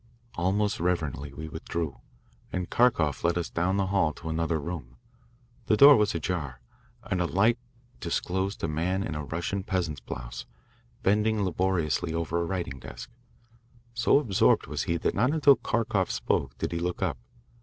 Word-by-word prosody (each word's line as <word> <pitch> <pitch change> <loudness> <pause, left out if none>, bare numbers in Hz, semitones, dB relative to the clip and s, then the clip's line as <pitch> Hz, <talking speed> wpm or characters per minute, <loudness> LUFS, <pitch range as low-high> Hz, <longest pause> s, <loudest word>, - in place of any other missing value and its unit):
Almost 100 +4 0
reverently 80 -5 -1
we 80 +3 -7
withdrew, 80 -4 -4 0.5
and 90 -1 -3
Kharkoff 100 - +2
led 85 +1 +2
us 85 - -3
down 95 +3 0
the 100 - +2
hall 80 -6 +2
to 80 - -8
another 80 0 0
room. 70 -6 -6 0.7
The 110 - +3
door 140 +3 +10
was 105 -5 +2
ajar, 75 -6 -3 0.4
and 90 - -1
a 90 - +1
light 110 +7 +3 0.4
disclosed 95 +3 -2
a - - +2
man 90 +5 -1
in - - -3
a 75 0 -4
Russian 85 +6 -3
peasant's 85 -7 -2
blouse, - - -7 0.6
bending 105 +1 +2
laboriously 85 -4 0
over 85 +1 -1
a - - -1
writing 85 -7 -3
desk. - - -9 0.8
So 115 +3 +4
absorbed 115 -10 +3
was - - -3
he 85 - 0
that - - 0
not 125 +8 +2
until 145 -3 +6
Kharkoff 110 -5 0
spoke - - -1
did - - -2
he 85 - -2
look 90 +1 -2
up. - - -1
85 Hz, 165 wpm, -28 LUFS, 80-100 Hz, 0.8 s, door